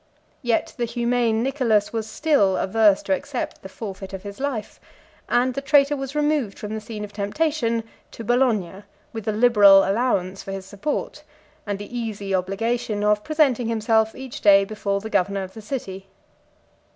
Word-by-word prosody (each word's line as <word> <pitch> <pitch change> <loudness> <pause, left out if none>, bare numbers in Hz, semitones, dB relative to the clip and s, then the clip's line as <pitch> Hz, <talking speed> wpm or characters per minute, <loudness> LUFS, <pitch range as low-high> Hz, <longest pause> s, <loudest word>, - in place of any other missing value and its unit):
Yet 240 -4 0
the 240 - 0
humane 235 -1 0
Nicholas 240 -7 +1
was 220 -1 -3
still 220 -9 +2
averse 205 0 +3
to 195 - 0
accept 255 +6 -4
the 190 - -9
forfeit 195 -2 -8
of 190 - -6
his 200 +2 -8
life; 265 -6 -4 0.5
and 250 +1 +2
the 275 - -3
traitor 285 0 +4
was 270 0 -6
removed 295 -8 0
from 210 0 -6
the 220 - -4
scene 215 -1 -7
of 205 0 -8
temptation 230 +2 -1 0.3
to 230 - -9
Bologna, 220 -6 +1 0.3
with 225 -2 -6
a - - +2
liberal 210 -4 +6
allowance 195 -4 0
for 195 - -7
his 195 -1 -6
support, 210 +9 -4 0.4
and 205 -1 -2
the 205 +4 -9
easy 210 -4 -4
obligation 205 +3 -1
of 210 0 +2
presenting 280 -7 +2
himself 220 -1 +1
each 265 -2 -8
day 200 -1 +6
before 200 -1 -2
the 220 - -6
governor 195 +1 +1
of 190 0 -9
the 220 - -9
city. 195 -5 -6
220 Hz, 170 wpm, -23 LUFS, 200-245 Hz, 0.5 s, liberal